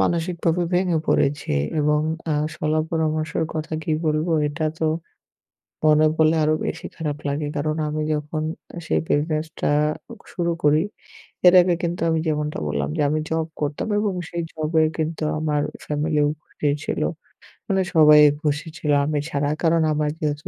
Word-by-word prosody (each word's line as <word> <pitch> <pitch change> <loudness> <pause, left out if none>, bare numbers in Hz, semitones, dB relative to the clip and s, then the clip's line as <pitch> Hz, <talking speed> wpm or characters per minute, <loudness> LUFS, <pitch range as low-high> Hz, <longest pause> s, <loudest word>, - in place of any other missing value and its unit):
মানসিকভাবে 170 0 0
ভেঙে 180 -2 +2
পড়েছি 145 - +1 0.3
এবং 150 0 +2 0.3
আ - - +2 0.2
শলা 155 +1 0
পরামর্শের 160 0 0
কথা 155 +1 -4
কি 155 - -1
বলবো? 155 +2 +1 0.2
এটা 155 +2 -3
তো 160 - 0 1.0
মনে 155 0 +5
পরলে 160 0 +4
আরো 155 +1 +3
বেশি - - -4
খারাপ 150 -3 -3
লাগে। 145 +1 -1
কারণ 155 +1 -1
আমি 155 +1 -2
যখন 150 +1 -3 0.4
সেই - - +1
বিজনেস 155 +1 0
টা - - +1 0.6
শুরু 170 -1 0
করি, 150 +1 +4 0.6
এর 180 - +8
আগে 175 -1 +2
কিন্তু 170 0 -2
আমি 160 0 +1
যেমনটা 150 -1 -1
বললাম 70 -1 -1
যে - - +1
আমি 155 +1 0
জব 160 0 -1
করতাম 145 +5 -2
এবং 210 -2 0 0.2
সেই 170 - -3
জবে 160 0 +1
কিন্তু 160 0 -2 0.2
আমার 150 -2 0 0.2
ফ্যামিলিও 150 0 +1 0.2
খুশি 150 -3 -2 0.2
ছিল। - - -2 0.7
মানে 195 -3 +2
সবাই 150 -1 +8 0.2
খুশি 150 +1 -1
ছিল 150 - -1
আমি 150 0 0
ছাড়া। 145 -1 0
কারণ 165 0 +3
আমার 150 0 0
যেহেতু 150 -1 -2
155 Hz, 155 wpm, -23 LUFS, 150-165 Hz, 1.0 s, এর